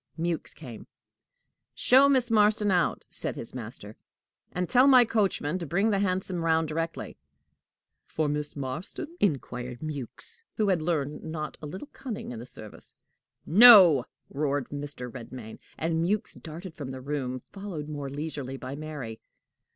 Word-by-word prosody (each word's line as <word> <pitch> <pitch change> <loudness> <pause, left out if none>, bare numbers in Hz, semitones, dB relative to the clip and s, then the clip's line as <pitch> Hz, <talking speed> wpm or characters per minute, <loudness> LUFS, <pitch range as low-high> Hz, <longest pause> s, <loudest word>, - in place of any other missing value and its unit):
Mewks 170 0 -2
came. 125 -8 -10 0.9
"Show 270 +3 +6
Miss 255 -4 +2
Marston 210 -1 +4
out," 180 -2 +1
said - - -5
his - - -8
master; - - -8 0.6
"and 180 -1 -2
tell 255 +2 +5
my 255 -3 +8
coachman 195 -7 0
to 170 - -5
bring 195 +8 +2
the 200 - +1
hansom 185 -2 -1
round 160 -1 +2
directly." 165 +1 -4 0.9
"For 155 -1 -1
Miss 150 0 -2
Marston?" 155 - -5
inquired 125 -8 -1
Mewks, 150 - -6 0.2
who 210 -2 +2
had 180 -4 +2
learned 150 -3 -2
not 155 -1 -5
a 150 - -6
little 190 - -8
cunning 235 - -6
in 120 - -6
the 120 - -9
service. 110 -5 -12 0.5
"No!" 185 - +9 0.3
roared 145 -2 -1
Mr. 145 -3 -6
Redmain; 120 -2 -9 0.2
and 165 0 0
Mewks 210 +5 -1
darted 165 +3 -8
from 145 -5 -7
the 130 0 -6
room, 130 -2 -3
followed 195 -7 -6
more 145 -2 -5
leisurely 140 -2 -5
by 130 +1 -6
Mary. 145 -7 -6
155 Hz, 150 wpm, -28 LUFS, 140-195 Hz, 0.9 s, No